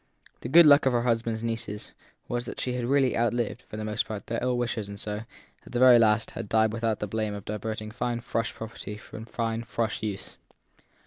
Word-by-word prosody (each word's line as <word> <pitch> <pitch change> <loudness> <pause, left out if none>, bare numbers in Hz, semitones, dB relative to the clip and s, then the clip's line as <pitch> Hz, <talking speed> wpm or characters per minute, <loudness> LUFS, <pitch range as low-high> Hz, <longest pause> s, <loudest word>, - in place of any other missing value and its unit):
The - - -6
good 170 +4 +8
luck 145 -2 +7
of 130 - +3
her 120 -1 +2
husband 115 -1 +1
s 110 - -8
nieces 115 -2 -4 0.4
was 120 0 -2
that - - -7
she 125 - -1
had 125 -1 -2
really 135 0 +3
outlived, 120 0 0
for 105 - -10
the 110 - -4
most 105 -1 -1
part, 105 -2 -5
their 115 - -2
ill 125 0 +1
wishers 115 -3 -2
and 100 0 -8
so, 105 +2 -4 0.4
at - - -14
the - - 0
very 125 -1 +8
last, 110 0 +3
had 100 - -6
died 110 -1 +3
without 115 -1 0
the 105 - -2
blame 110 0 -2
of 100 - -8
diverting 110 +1 -4
fine 120 +1 -2
Frush 115 -1 -2
property 110 -1 -7
from 110 +1 -10
fine 115 0 -2
Frush 115 -1 -2
use. 105 -3 -5
115 Hz, 220 wpm, -27 LUFS, 110-120 Hz, 0.4 s, good